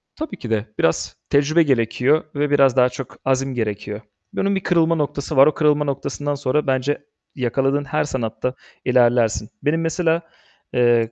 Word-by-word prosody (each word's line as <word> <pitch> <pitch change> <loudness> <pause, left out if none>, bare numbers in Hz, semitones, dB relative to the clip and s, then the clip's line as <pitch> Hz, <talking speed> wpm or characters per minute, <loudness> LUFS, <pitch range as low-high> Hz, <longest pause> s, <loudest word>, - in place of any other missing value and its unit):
Tabii 310 -10 -6
ki 120 - -8
de 110 -1 0
biraz 80 - 0
tecrübe 150 +4 +3
gerekiyor 130 +3 +2
ve 145 0 0
biraz 135 -3 +4
daha 125 0 +5
çok 125 0 -8
azim 135 0 +1
gerekiyor. 105 -2 -3 0.3
Bunun 200 0 0
bir 190 - -2
kırılma 165 -2 +2
noktası 145 -2 -3
var. 135 +2 +8
O 155 - +3
kırılma 150 -1 +2
noktasından 145 +1 -3
sonra 140 +1 -1
bence 135 +2 0 0.3
yakaladığın 135 +3 0
her 150 +1 0
sanatta 125 -2 -3 0.3
ilerlersin. 120 -4 +2
Benim 160 +3 +1
mesela, 165 0 +1 0.5
eee, 120 -2 +3
135 Hz, 155 wpm, -21 LUFS, 125-150 Hz, 0.5 s, var